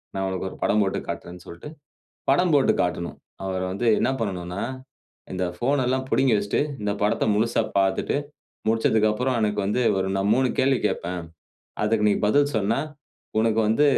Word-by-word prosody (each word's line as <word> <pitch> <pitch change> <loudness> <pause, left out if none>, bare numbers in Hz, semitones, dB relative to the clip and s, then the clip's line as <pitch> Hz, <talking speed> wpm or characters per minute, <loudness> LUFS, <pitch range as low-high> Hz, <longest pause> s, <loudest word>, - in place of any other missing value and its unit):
நான் 95 - -1
உனக்கு 95 0 -3
ஒரு - - -11
படம் 105 0 +3
போட்டு 95 - -1
காட்டுறேன்", 90 0 -6
சொல்டு 85 - -9 0.6
படம் 175 +6 +4
போட்டு 140 -2 +4
காட்டணும். 85 -1 -2 0.3
அவர் 95 -1 -2
வந்து 100 +6 -3
என்ன - - +2
பண்ணணுனா, 90 -3 -3 0.7
இந்த 95 0 -2
ஃபோன் 135 +7 +1
எல்லாம் 130 +1 0
புடுங்கி 130 -3 +3
வச்சிட்டு, 100 0 0 0.2
இந்த 105 0 0
படத்த 105 - +1
முழுசா 115 +2 +2 0.2
பாத்துட்டு, 95 -1 +1 0.5
முடிச்சதுக்கப்பறம் 110 +2 +2
எனக்கு 105 -1 0
வந்து 105 +5 0 0.2
ஒரு, 95 0 0
நான் 95 - +1
ஒரு - - +2
3 130 0 +2
கேள்வி 135 -1 +3
கேட்பேன். 90 -3 -3 0.6
அதுக்கு 105 -1 +2
நீ - - +3
பதில் 145 +6 +3
சொன்னா 110 +5 +1 0.6
உனக்கு 110 0 +2
வந்து 115 +7 +3
105 Hz, 165 wpm, -24 LUFS, 95-125 Hz, 0.7 s, படம்